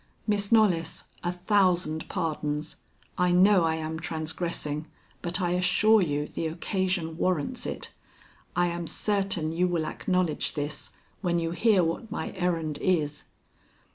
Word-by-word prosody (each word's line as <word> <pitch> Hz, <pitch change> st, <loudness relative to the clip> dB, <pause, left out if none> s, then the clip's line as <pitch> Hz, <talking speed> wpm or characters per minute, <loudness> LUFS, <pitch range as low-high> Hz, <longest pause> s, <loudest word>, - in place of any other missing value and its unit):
"Miss 205 Hz, -1 st, +2 dB
Knollys, 185 Hz, -8 st, +3 dB, 0.2 s
a 175 Hz, -, 0 dB
thousand 180 Hz, -4 st, +1 dB
pardons. 155 Hz, -4 st, -2 dB, 0.4 s
I 180 Hz, 0 st, +3 dB
know 185 Hz, 0 st, +5 dB
I 160 Hz, 0 st, +1 dB
am 160 Hz, 0 st, -4 dB
transgressing, 160 Hz, -1 st, -3 dB, 0.3 s
but, 175 Hz, +1 st, -1 dB
I 175 Hz, -2 st, 0 dB
assure 185 Hz, +5 st, +4 dB
you, 150 Hz, -4 st, 0 dB
the 160 Hz, -, -3 dB
occasion 175 Hz, -1 st, -2 dB
warrants 175 Hz, -6 st, 0 dB
it. -, -, -5 dB, 0.6 s
I 175 Hz, +1 st, +3 dB
am 170 Hz, -1 st, -4 dB
certain 195 Hz, -6 st, 0 dB
you 175 Hz, +2 st, +1 dB
will 170 Hz, -3 st, 0 dB
acknowledge 180 Hz, -3 st, 0 dB
this 145 Hz, 0 st, -4 dB, 0.3 s
when 175 Hz, -3 st, +1 dB
you 165 Hz, -1 st, -1 dB
hear 195 Hz, +2 st, +3 dB
what 170 Hz, +7 st, -2 dB
my -, -, -3 dB
errand 165 Hz, -5 st, -1 dB
is." 155 Hz, -5 st, 0 dB
175 Hz, 140 wpm, -27 LUFS, 160-185 Hz, 0.6 s, know